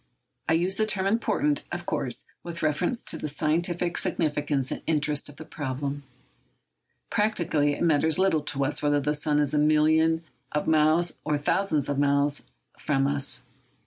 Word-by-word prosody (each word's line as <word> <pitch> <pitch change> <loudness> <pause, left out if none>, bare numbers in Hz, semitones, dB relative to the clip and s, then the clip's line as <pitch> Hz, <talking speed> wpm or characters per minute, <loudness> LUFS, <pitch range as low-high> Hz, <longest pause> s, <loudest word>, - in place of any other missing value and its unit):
I - - +4
use 180 +4 +1
the 215 - +1
term 195 -3 0
important, 260 +8 +1
of - - -4
course, - - -2 0.2
with 170 -1 -7
reference 175 +10 0
to - - 0
the - - -3
scientific 170 +4 0
significance 145 -4 0
and - - -4
interest 150 -2 0
of 145 - -12
the 160 - -10
problem. 140 -1 -4 1.1
Practically, 170 -9 +1
it - - -3
matters 160 -1 +3
little 185 -5 +2
to 140 -1 -1
us 145 - -1
whether 145 0 +2
the 150 +1 0
sun 150 0 0
is 145 -1 +1
a 150 - +3
million 155 +2 +3 0.3
of 150 - -1
miles 160 +2 +2
or 150 -1 0
a - - +1
thousand 175 +5 0
millions 145 -1 -1
of 140 -1 -1
miles 140 0 +2 0.3
from 135 -2 +1
us. 140 0 0
150 Hz, 175 wpm, -26 LUFS, 145-170 Hz, 1.1 s, I